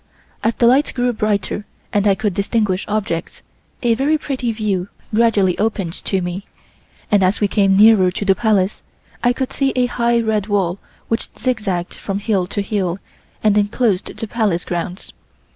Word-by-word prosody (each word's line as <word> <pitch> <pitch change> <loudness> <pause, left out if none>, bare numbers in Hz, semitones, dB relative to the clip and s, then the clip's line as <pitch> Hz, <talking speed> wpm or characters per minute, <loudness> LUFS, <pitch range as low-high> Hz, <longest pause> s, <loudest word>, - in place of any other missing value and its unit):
As 225 - +1
the 235 - +2
light 265 +5 +3
grew 245 -1 +1
brighter 210 -1 -1 0.3
and 205 0 +2
I 195 - +4
could 205 0 -1
distinguish 200 -1 0
objects, 210 -5 -3 0.4
a 235 -1 +4
very 280 +6 +2
pretty 260 -5 -2
view 205 -4 -2 0.2
gradually 210 -5 +3
opened 200 -5 -1
to 190 -2 0
me, 180 +3 -5 0.6
and 205 -2 +4
as 185 +2 +2
we 205 - +2
came 195 -1 +3
nearer 210 -3 +6
to 190 +3 -4
the 195 - +5
Palace 205 -2 +1 0.4
I 245 - +4
could 255 +1 -3
see 275 -1 +1
a 250 -1 +3
high 235 -1 +1
red 215 -3 0
wall 195 -3 0 0.3
which 225 - -2
zigzagged 210 -8 -2
from 195 -1 -4
hill 200 -3 0
to 205 +1 -2
hill 190 -4 -1 0.5
and 210 -1 +4
enclosed 205 -1 0
the 225 - -4
Palace 210 -6 0
grounds. 175 +2 -4
210 Hz, 170 wpm, -19 LUFS, 190-230 Hz, 0.6 s, nearer